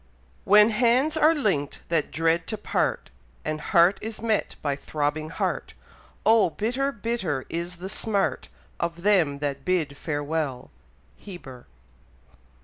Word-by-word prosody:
When 210 +2 +7
hands 245 +7 +3
are 315 +1 +5
link'd 190 - -1
that 165 -3 +1
dread 165 +2 +1
to 215 - -3
part, - - -1 0.3
And 155 0 -2
heart 175 +5 +4
is 220 0 -6
met 220 -2 0
by 145 -2 0
throbbing 150 +2 -2
heart; - - -3 0.5
Oh! 220 -4 +5
bitter, 250 - -1
bitter 205 - -2
is 170 +2 -4
the 180 +2 -7
smart 200 0 -1 0.3
Of 170 0 -3
them 180 -9 +3
that 140 -1 -3
bid 165 -6 0
farewell. 145 -4 -3 0.5
Heber. 140 -11 -11
175 Hz, 130 wpm, -25 LUFS, 155-215 Hz, 0.5 s, When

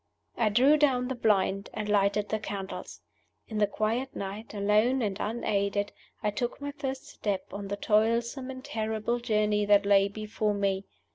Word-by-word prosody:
I 225 -2 +2
drew 260 +8 +5
down 260 -4 +2
the - - 0
blind 200 -4 +1
and 215 -1 -3
lighted 205 0 +2
the 215 - 0
candles. 195 -2 -6 0.5
In 215 -2 -3
the 205 - +4
quiet 225 +6 -1
night, 200 +3 -5
alone 215 +5 +2
and 200 -3 -1
unaided, 205 -2 -1 0.3
I 210 - +1
took 240 +3 -3
my 285 0 -4
first 270 -2 -5
step 200 -3 -3
on 200 0 -5
the 200 +1 -3
toilsome 230 +5 +1
and 260 +1 -7
terrible 220 -2 -1
journey 210 -3 +1
that 205 0 +5
lay 200 -1 +5
before 215 0 -2
me. 195 -1 0
215 Hz, 165 wpm, -29 LUFS, 200-240 Hz, 0.5 s, drew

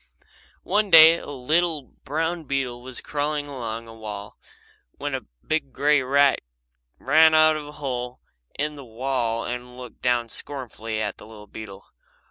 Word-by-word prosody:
One 210 0 +1
day 165 0 +9
a - - -10
little 150 +3 0
brown 160 +6 -3
beetle 130 -3 -2
was 130 0 -5
crawling 145 0 -2
along 115 -4 -5
a 115 - -11
wall 105 -2 -8 0.6
when - - -4
a - - -4 0.2
big 155 -3 -1
grey 145 +1 +3
rat 140 +1 +3 0.6
ran 155 +3 +5
out 155 0 +6
of 150 -1 -5
a - - -9
hole 125 -4 -4 0.4
in 150 +1 -1
the 140 - -9
wall 115 -1 -2
and 125 0 -6
looked 125 -2 -11
down 120 -2 +1
scornfully 115 -3 -4
at 105 -1 -3
the - - -12
little 105 -1 -12
beetle. 100 -1 -10
130 Hz, 155 wpm, -24 LUFS, 115-150 Hz, 0.6 s, day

